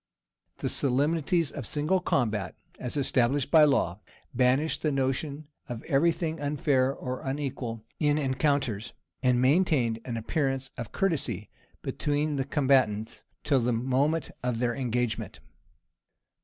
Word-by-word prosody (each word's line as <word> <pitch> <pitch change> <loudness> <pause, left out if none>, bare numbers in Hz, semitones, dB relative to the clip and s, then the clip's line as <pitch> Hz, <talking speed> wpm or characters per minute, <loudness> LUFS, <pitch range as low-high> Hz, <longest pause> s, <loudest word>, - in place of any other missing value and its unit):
The - - -3
solemnities 150 +4 +1
of 135 -6 -5
single 155 +6 +1
combat, 105 - 0 0.2
as 125 +3 -4
established 135 0 +1
by 155 -2 +8
law, 105 - +1 0.3
banished 135 +5 +2
the 155 - +1
notion 140 +2 -2 0.2
of 120 -2 -5
every 145 +5 +3
thing 165 -1 -3
unfair 140 -2 +2
or 130 -2 -5
unequal 135 -5 -4
in 150 -1 +2
rencounters, 135 -6 0 0.3
and 125 -1 +3
maintained 130 -5 +3
an 120 -2 -4
appearance 135 +2 -1
of 115 -2 -6
courtesy 130 - -1 0.3
between 145 0 -1
the 135 - -1
combatants 130 -7 +1 0.2
till 140 -3 +3
the 120 0 +1
moment 135 +7 0
of 125 -2 -1
their 120 0 0
engagement. 125 -2 -2
135 Hz, 130 wpm, -28 LUFS, 125-150 Hz, 0.3 s, by